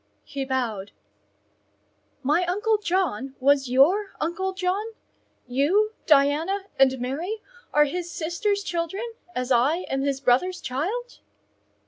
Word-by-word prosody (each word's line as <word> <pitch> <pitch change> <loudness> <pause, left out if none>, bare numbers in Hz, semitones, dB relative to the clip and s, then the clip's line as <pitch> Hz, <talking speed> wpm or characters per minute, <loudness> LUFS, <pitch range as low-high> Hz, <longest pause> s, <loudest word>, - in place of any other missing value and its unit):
He 275 -1 -4
bowed. 230 -7 -2 1.3
"My 300 +7 +3
uncle 420 +4 +1
John 330 - -1
was 275 -1 +3
your 355 +11 +4
uncle 345 +4 -1
John? 375 +2 -1 0.6
You, 335 - +2
Diana, 305 +7 +3 0.2
and 265 -1 +5
Mary 330 - -3 0.3
are 295 0 +5
his 350 +4 -4
sister's 355 +5 -1
children, 345 +5 -2 0.3
as 250 +1 -2
I 275 +9 +3
am 270 0 0
his 275 -1 0
brother's 275 +9 +2
child?" 390 - -3
320 Hz, 115 wpm, -25 LUFS, 270-380 Hz, 1.3 s, and